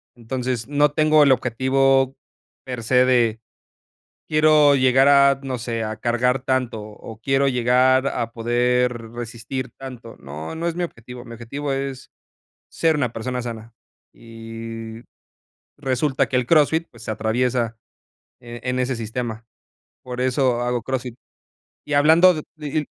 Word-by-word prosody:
entonces, 125 0 -4
no 145 0 +2
tengo 155 0 +4
el 140 - +5
objetivo 130 +2 +2 0.5
per 125 -3 -5
se 125 +2 +4
de 120 -3 +2 0.9
quiero 155 -1 +5
llegar 130 0 +4
a, 140 -1 +5
no 130 -2 -3
sé, 115 -1 -3
a 110 0 -4
cargar 125 +2 +1
tanto, 130 -5 -1
o 110 +1 -11
quiero 135 +2 +2
llegar 130 +1 +3
a 115 -4 -2
poder 120 0 0
resistir 120 +2 -5
tanto. 125 -4 -10
No, 75 - -8
no 170 +1 -3
es 170 - -2
mi 175 - -2
objetivo, 125 -5 -8
mi 115 -1 -11
objetivo 135 +5 -5
es 135 -1 -4 0.6
ser 160 -1 +1
una 125 -5 -1
persona 125 +2 -3
sana. 115 -1 -7 0.4
Y 115 0 -9 0.8
resulta 130 +1 0
que 130 - -1
el 125 - +2
CrossFit, 160 +2 +3
pues, 115 -1 -15
se - - -4
atraviesa, 115 +1 -1 0.6
eh, 120 0 -9
en 125 0 -1
ese 125 -1 -1
sistema. 115 0 -5 0.6
Por 125 0 -6
eso 130 -1 +1
hago 120 -1 -1
CrossFit. 125 -1 -4 0.7
Y 150 - -4
hablando 160 +5 +6
de 155 - -5
di 150 0 -3
125 Hz, 145 wpm, -22 LUFS, 115-135 Hz, 0.9 s, hablando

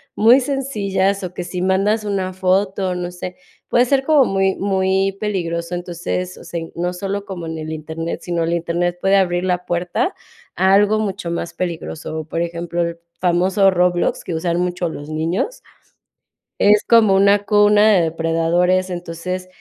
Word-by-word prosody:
muy 235 +5 +6
sencillas. 200 -8 -1
O 180 -1 -5
que 180 - -5
si 180 +1 -5
mandas 195 +4 +1
una 195 -3 -2
foto, 190 0 0
no 175 0 -4
sé, 180 0 -7 0.3
puede 245 +1 +4
ser 270 +1 +2
como 295 -3 +5
muy 195 -2 +1
muy 190 0 0
peligroso. 170 -4 -2
Entonces, 160 - -4
o - - -12
sea, 170 - -5
in 165 - -8
no 175 +1 -2
solo 200 +2 -4
como 185 -4 -6
en 160 0 -5
el 155 0 -6
internet, 160 +2 -5
sino 170 -2 -1
el 165 - -1
internet 170 +1 -1
puede 195 +1 +3
abrir 175 -2 +1
la 180 -1 -1
puerta 175 - -1 0.4
a 190 0 +3
algo 205 +2 +4
mucho 195 -5 -3
más 170 0 -4
peligroso. 165 -3 -4
O - - -11
por 165 +2 -3
ejemplo, 170 0 -3
el 170 0 -4 0.2
famoso 185 +2 +3
Roblox, 180 -1 +1
que 170 - -4
usan 170 +1 -1
mucho 180 -1 -1
los 145 -1 -8
niños, 165 - -2 1.0
es 210 +1 +5
como 220 -4 +5
una 200 +1 +4
cuna 210 0 +5
de 185 - +4
depredadores. 165 +3 +1
Entonces, 175 +1 -5
180 Hz, 170 wpm, -19 LUFS, 170-200 Hz, 1.0 s, muy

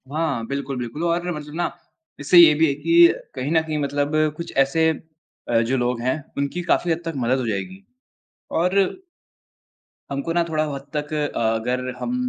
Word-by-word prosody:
हाँ। 145 -6 -1
बिल्कुल, 140 0 -3
बिल्कुल 125 +6 -5
और 170 +1 0
मतलब 150 0 -8
ना 175 +1 -1 0.5
इससे 145 +5 +3
ये 170 -3 +9
भी 160 +2 +3
है 140 - +1
कि 165 +3 +5 0.2
कहीं 130 +3 -3
न 160 -1 +4
कहीं 155 -1 -3
मतलब 145 +1 -1 0.2
कुछ 170 0 -6
ऐसे 140 +4 +3 0.6
अ, 115 -1 +3
जो 125 +4 0
लोग 120 -1 -1
हैं 130 +2 +1 0.2
उनकी 140 +5 -2
काफ़ी 170 0 +1
हद 165 +1 -1
तक 165 - -3
मदद 130 +1 +1
हो 125 - -2
जाएगी। 185 - -4 0.7
और 180 +3 +1 1.3
हमको 140 +4 -3
ना 170 0 +2
थोड़ा 155 -1 +1
हद 140 0 -7
तक 150 +1 -3 0.2
अगर 115 +3 -1
हम 245 - -2
145 Hz, 175 wpm, -22 LUFS, 130-165 Hz, 1.3 s, ये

